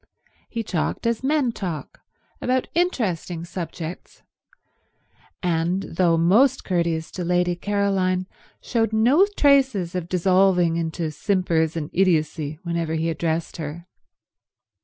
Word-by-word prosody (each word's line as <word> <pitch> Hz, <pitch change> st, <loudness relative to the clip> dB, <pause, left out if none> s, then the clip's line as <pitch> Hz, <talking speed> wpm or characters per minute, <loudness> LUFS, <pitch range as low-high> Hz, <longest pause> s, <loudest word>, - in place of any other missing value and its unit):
He 230 Hz, -1 st, -3 dB
talked 185 Hz, +3 st, -2 dB
as 230 Hz, +1 st, 0 dB
men 280 Hz, -3 st, +2 dB
talk, 180 Hz, -8 st, -6 dB, 0.4 s
about 255 Hz, 0 st, 0 dB
interesting 185 Hz, -, -1 dB
subjects, 170 Hz, -1 st, -7 dB, 1.2 s
and, 175 Hz, +2 st, 0 dB
though 170 Hz, -1 st, +1 dB
most 225 Hz, +11 st, +4 dB
courteous 170 Hz, -3 st, -1 dB
to 180 Hz, -, -5 dB
Lady 180 Hz, 0 st, +1 dB
Caroline, 190 Hz, -1 st, 0 dB, 0.4 s
showed 225 Hz, -2 st, 0 dB
no 260 Hz, -, +5 dB
traces 265 Hz, -, +3 dB
of 180 Hz, -2 st, -4 dB
dissolving 185 Hz, -1 st, +3 dB
into 165 Hz, -1 st, -2 dB
simpers 165 Hz, -2 st, 0 dB
and 150 Hz, -2 st, -4 dB
idiocy 155 Hz, -4 st, +1 dB
whenever 170 Hz, -2 st, -2 dB
he 165 Hz, +1 st, 0 dB
addressed 165 Hz, 0 st, -2 dB
her. 160 Hz, +1 st, -6 dB
180 Hz, 115 wpm, -23 LUFS, 165-205 Hz, 1.2 s, no